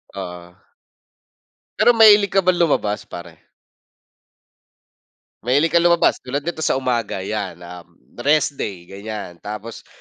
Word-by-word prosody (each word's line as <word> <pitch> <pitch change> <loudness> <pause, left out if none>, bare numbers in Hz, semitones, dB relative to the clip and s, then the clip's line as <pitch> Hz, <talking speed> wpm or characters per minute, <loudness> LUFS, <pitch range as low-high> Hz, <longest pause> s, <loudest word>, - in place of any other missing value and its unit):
Oo. 90 -2 -8 1.2
Pero 240 - +5
mahilig 210 -3 +6
ka 195 - +4
ba - - +4
lumabas 145 -12 0
pare? 85 -2 -12 1.9
Mahilig 145 +6 +2
ka 170 - +4
lumabas? 170 0 +3
Tulad 140 +3 -4
nito 170 -1 -5
sa 155 - +1
umaga 120 -7 -2
yan, 95 -4 -5
um, 85 -1 -12 0.2
rest 145 +1 +1
day 95 -4 -5
ganyan. 100 -1 -8
Tapos 105 +4 -8
110 Hz, 120 wpm, -20 LUFS, -, 1.9 s, mahilig